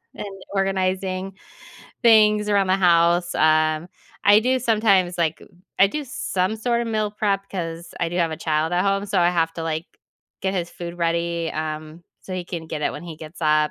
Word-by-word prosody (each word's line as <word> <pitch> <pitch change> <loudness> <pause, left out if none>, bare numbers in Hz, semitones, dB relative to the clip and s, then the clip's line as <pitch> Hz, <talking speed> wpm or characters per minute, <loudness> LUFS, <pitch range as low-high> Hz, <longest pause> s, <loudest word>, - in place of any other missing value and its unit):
and - - -6 0.3
organizing 190 0 -1 0.7
things 215 -2 +5
around 200 -2 +2
the 185 - +3
house. 175 -1 +3
Um, 155 +1 +2 0.4
I 205 +1 +7
do 255 +3 +1
sometimes 200 -6 +2
like 165 -2 0
uh, - - -14 0.3
I 195 - +8
do 300 +8 -4
some 195 -6 -2
sort 235 +1 0
of 235 - -2
meal 215 -2 0
prep 200 -2 -1
'cause 170 -2 -5
I 170 - +1
do 175 - -5
have 170 -2 +1
a 160 - -4
child 155 +2 -1
at 175 +1 +2
home, 195 0 +1
so 200 -1 0
I 175 0 +4
have 165 -2 0
to, 165 - -5
like, 160 0 -3 0.5
get 190 0 -1
his 175 -2 -2
food 175 0 -7
ready, 170 0 -1
um, 155 +1 -5 0.2
so 190 - -9
he 180 -1 -4
can 170 -2 -6
get 155 -1 -5
it - - 0
when - - -8
he 165 -2 -8
gets 155 +3 -11
up 155 -1 +3
180 Hz, 200 wpm, -22 LUFS, 165-200 Hz, 0.7 s, I